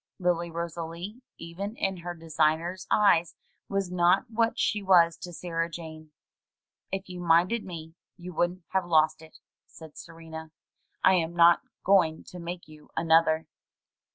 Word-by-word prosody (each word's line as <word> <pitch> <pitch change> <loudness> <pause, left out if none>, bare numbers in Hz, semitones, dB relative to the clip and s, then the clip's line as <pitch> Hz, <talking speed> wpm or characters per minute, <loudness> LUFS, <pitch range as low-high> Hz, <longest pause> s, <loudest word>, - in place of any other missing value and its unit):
Lily 175 -1 0
Rosalie 170 +6 -6 0.2
even 190 +6 -6
in 195 -4 -1
her 175 0 -6
designer's 165 +3 0
eyes 175 -5 +3 0.3
was 195 -2 -1
not 180 +5 +3
what 230 +1 +1
she 210 - 0
was 175 -4 +5
to 180 - -8
Sarah 165 -1 -3
Jane. 160 -2 -9 0.8
"If 195 0 -4
you'd 180 -1 -7
minded 175 +7 +3
me 160 -3 -8 0.2
you 180 0 -9
wouldn't 175 +2 -1
have 190 -2 0
lost 155 -1 +3
it," 160 0 -15 0.3
said 160 -2 -13
Ser 165 0 -12
ena. 160 -1 -9 0.5
"I 190 - +6
am 170 -2 0
not 170 0 +6 0.2
going 180 -5 +3
to 180 - -9
make 175 +1 -7
you 155 -1 -16
another." 160 -1 +3
170 Hz, 150 wpm, -28 LUFS, 165-180 Hz, 0.8 s, I